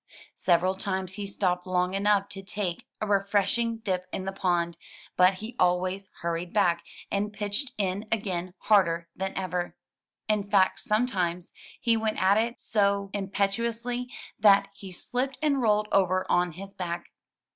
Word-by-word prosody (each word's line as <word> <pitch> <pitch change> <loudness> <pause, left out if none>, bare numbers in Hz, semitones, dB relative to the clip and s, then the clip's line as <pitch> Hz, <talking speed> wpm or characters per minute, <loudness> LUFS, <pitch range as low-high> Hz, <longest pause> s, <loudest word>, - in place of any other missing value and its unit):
Several 180 +1 +2
times 190 -1 -3
he 205 0 -5
stopped 180 -2 -1
long 180 0 +1
enough 200 0 +3
to 195 - -8
take 195 -3 -4
a - - +1
re 205 -1 +3
freshing 225 +3 +1
dip 185 -3 -1
in 185 - -4
the 195 - -2
pond; 175 -3 0 0.4
but 185 +1 +5
he 220 +5 -7
always 185 +2 +1
hurried 170 +1 -2
back, 175 -5 +2 0.3
and 205 +1 0
pitched 210 +6 -2
in 200 +1 -1
again 185 -4 -2
harder 170 -5 +3
than 190 0 -3
ever. 180 -2 -2 0.5
In 210 -2 0
fact, 195 -2 +4
he - - -8
sometimes 185 -6 0 0.3
went 225 -2 +2
at 195 +3 +4
it 235 +2 -1
so 200 -2 +1
impetuously 230 +5 -1 0.3
that 200 -1 +6
he 195 -1 -10
slipped 255 +8 -2
and 290 -3 +2
rolled 210 -2 +3
over 185 -1 +3
on 175 -1 +2
his 195 +3 -9
back. 170 -1 -5
195 Hz, 155 wpm, -28 LUFS, 180-210 Hz, 0.5 s, that